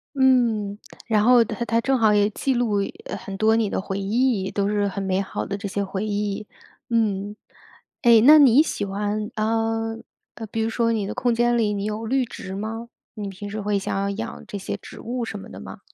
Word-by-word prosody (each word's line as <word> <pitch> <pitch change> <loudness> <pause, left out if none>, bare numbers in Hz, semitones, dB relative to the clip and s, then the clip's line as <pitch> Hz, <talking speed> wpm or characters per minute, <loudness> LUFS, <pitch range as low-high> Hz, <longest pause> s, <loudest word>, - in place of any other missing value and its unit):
嗯， 235 -6 +2 0.3
然 215 -2 +2
后 245 0 +6
它 225 +2 -4
它 230 0 +1
正 270 +2 +1
好 220 -2 +4
也 205 0 +3
记 265 +5 -1
录 235 -4 +1 0.4
很 195 - -7
多 220 +2 +3
你 225 -2 +1
的 - - -2
回 195 0 -4
忆， 210 -1 +1
都 200 0 -1
是 205 -1 +1
很 195 0 -4
美 190 0 0
好 195 - -3
的 200 - -3
这 200 0 -5
些 200 +1 -2
回 195 +2 -3
忆。 205 0 -2 0.4
嗯， 210 -3 0 0.7
哎， 235 -2 +7
那 305 +4 +9
你 275 -1 +7
喜 310 - -3
欢， 205 +2 -2
呃， 225 +1 -1 0.5
比 225 - -1
如 225 - 0
说 230 0 +1
你 215 -3 -1
的 - - -4
空 245 -2 +1
间 240 +1 +2
里， 210 -2 +1
你 200 0 -3
有 215 +2 -3
绿 260 +3 +1
植 205 -5 -8
吗？ 225 +3 -5 0.3
你 210 -2 -5
平 195 +1 -7
时 215 +1 -4
会 205 0 0
想 195 - -3
要 200 0 0
养 220 +3 -6
这 210 -1 -6
些 195 - -4
植 - - -11
物 240 +1 -3
什 205 - -6
么 - - -10
的 - - -10
吗？ - - -10
215 Hz, 230 characters per minute, -23 LUFS, 200-230 Hz, 0.7 s, 那